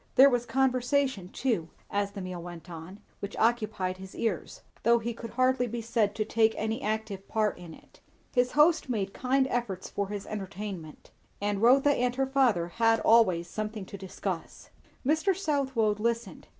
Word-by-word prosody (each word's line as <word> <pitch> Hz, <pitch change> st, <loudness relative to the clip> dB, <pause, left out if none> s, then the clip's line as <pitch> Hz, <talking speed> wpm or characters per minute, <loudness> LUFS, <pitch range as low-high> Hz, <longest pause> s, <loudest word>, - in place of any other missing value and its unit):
There 275 Hz, +1 st, +8 dB
was 245 Hz, -1 st, 0 dB
conversation 260 Hz, -5 st, +1 dB
too, 210 Hz, -9 st, -1 dB, 0.2 s
as 200 Hz, 0 st, -1 dB
the 200 Hz, -, -6 dB
meal 185 Hz, -1 st, -5 dB
went 175 Hz, 0 st, -9 dB
on, 170 Hz, +5 st, -9 dB, 0.2 s
which 200 Hz, -, -6 dB
occupied 215 Hz, -5 st, +1 dB
his 190 Hz, 0 st, -10 dB
ears, 215 Hz, -7 st, -3 dB, 0.2 s
though 235 Hz, +1 st, +5 dB
he 235 Hz, +1 st, -3 dB
could 230 Hz, 0 st, -8 dB
hardly 255 Hz, +1 st, +2 dB
be 235 Hz, +1 st, -4 dB
said 225 Hz, -3 st, +1 dB
to 215 Hz, -, -1 dB
take 220 Hz, 0 st, +2 dB
an 220 Hz, +1 st, -1 dB
active 215 Hz, -2 st, -3 dB
part 215 Hz, -4 st, 0 dB
in 170 Hz, -2 st, -10 dB
it. -, -, -21 dB, 0.3 s
His 250 Hz, -1 st, +2 dB
host 310 Hz, -1 st, +4 dB
made 200 Hz, -5 st, -1 dB
kind 265 Hz, +1 st, +2 dB
efforts 225 Hz, -6 st, -3 dB
for 200 Hz, -1 st, -2 dB
his 205 Hz, 0 st, -5 dB
entertainment; 195 Hz, -5 st, -7 dB, 0.3 s
and 205 Hz, 0 st, -1 dB
Rotha 270 Hz, +5 st, +6 dB
and 250 Hz, -3 st, +1 dB
her 270 Hz, +1 st, +1 dB
father 255 Hz, -11 st, +2 dB
had 225 Hz, +4 st, +3 dB
always 185 Hz, -7 st, +4 dB
something 215 Hz, 0 st, -4 dB
to 200 Hz, -, -9 dB
discuss. 190 Hz, -2 st, -6 dB, 0.3 s
Mr. 320 Hz, +6 st, +2 dB
Southwode 265 Hz, -, 0 dB
listened. 235 Hz, +1 st, -2 dB
220 Hz, 170 wpm, -29 LUFS, 195-250 Hz, 0.3 s, There